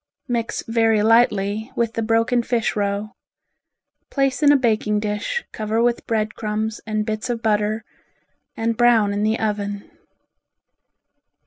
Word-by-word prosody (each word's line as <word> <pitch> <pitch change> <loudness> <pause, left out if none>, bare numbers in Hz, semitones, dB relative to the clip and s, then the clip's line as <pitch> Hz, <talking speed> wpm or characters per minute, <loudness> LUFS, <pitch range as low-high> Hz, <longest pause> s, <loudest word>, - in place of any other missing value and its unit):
Mix 235 -3 -2
very 225 -2 +2
lightly 220 0 +2
with 230 -1 0
the 225 - -2
broken 230 +2 +2
fish 235 -1 -1
roe. 205 0 -1 1.0
Place 275 0 0
in 290 -1 +6
a 290 - +6
baking 215 -4 +1
dish, 210 - -2
cover 220 +1 -2
with 235 0 +1
bread 215 -1 0
crumbs 215 0 -3
and 215 -1 -1
bits 215 +3 -3
of 235 -1 -3
butter, 215 0 +1 0.7
and 230 0 0
brown 225 -4 +4
in 205 - -1
the 215 +2 +1
oven. 205 -2 -3
220 Hz, 135 wpm, -21 LUFS, 210-235 Hz, 1.0 s, in